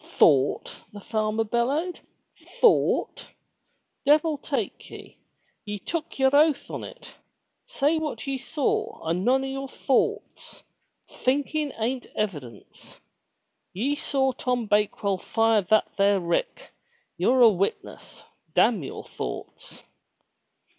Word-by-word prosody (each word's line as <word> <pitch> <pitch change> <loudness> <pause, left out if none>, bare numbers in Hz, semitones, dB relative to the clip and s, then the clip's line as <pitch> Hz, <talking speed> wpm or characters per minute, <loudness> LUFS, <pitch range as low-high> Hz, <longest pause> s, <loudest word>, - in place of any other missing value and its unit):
"Thought!" 140 -3 +2 0.2
the 205 - -10
farmer 215 +1 -1
bellowed. 270 +11 -1 0.6
"Thought! 475 - +2 0.8
Devil 300 +1 +3
take 265 -8 -4
ye. - - -12 0.4
Ye 210 0 -5
took 315 - -5
yer 265 -1 +3
oath 300 0 +3
on - - -5
it! - - -11 0.5
Say 315 - +1
what 310 -2 -4
ye 270 -1 -3
saw 280 - -2
and 170 +3 0
none 265 +3 +3
o' - - -3
your 270 0 -4
thoughts! 265 0 -2 0.4
Thinkin' 290 +3 -1
an't 245 +3 -3
evidence! 145 - -6 0.7
Ye 250 +10 0
saw 280 -3 0
Tom 250 -2 -2
Bakewell 205 -2 0
fire 225 0 +2
that 215 +4 +2
there 200 0 +4
rick. - - -2 0.4
You're 255 0 +2
a 235 - +9
witness. 195 -1 -4 0.3
Damn 225 -7 +4
your 135 - -7
thoughts!" - - -8
250 Hz, 115 wpm, -25 LUFS, 210-285 Hz, 0.8 s, a